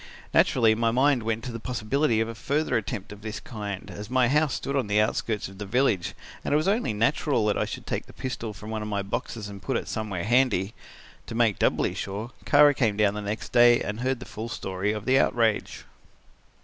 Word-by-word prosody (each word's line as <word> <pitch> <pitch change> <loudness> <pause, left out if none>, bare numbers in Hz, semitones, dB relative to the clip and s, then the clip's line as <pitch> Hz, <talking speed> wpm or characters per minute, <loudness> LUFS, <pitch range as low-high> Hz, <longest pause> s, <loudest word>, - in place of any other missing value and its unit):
Naturally 115 -3 +4
my 115 +1 +1
mind 130 +2 +3
went 115 0 -2
to 125 - -5
the 115 - -6
possibility 120 +2 0
of 115 - +1
a 115 - -5
further 145 +7 -1
attempt 100 -3 -3
of 105 0 -10
this 110 0 -5
kind, 105 -4 -6
as 105 +1 -8
my 130 -1 +3
house 150 -1 +2
stood 140 - -3
on 135 -6 0
the 105 +1 +2
outskirts 110 0 0
of 95 +1 -13
the 105 - -4
village, 110 -5 +1 0.3
and - - -3
it 145 - +5
was 155 +4 0
only 205 - +1
natural 115 +2 +1
that 105 - +2
I - - +1
should - - -7
take - - -3
the - - -12
pistol 120 -4 -4
from 105 +2 -9
one 110 -1 -3
of 105 - -4
my 100 -1 -2
boxes 105 +2 -4
and 100 -1 -9
put - - -1
it - - -5
somewhere 105 -5 -3
handy. 115 -4 +2 0.5
To - - -6
make 115 -3 +2
doubly - - +2
sure, 105 +5 -5
Kara 145 0 +6
came 110 -7 +1
down 105 -2 +3
the 105 - -4
next 105 +2 -4
day 120 0 +6
and 105 +2 -4
heard 130 0 -1
the - - -8
full 110 +2 -6
story 95 -2 -2
of 105 -1 -5
the 130 +1 +4
outrage. 115 -3 +1
110 Hz, 225 wpm, -26 LUFS, 105-130 Hz, 0.5 s, Kara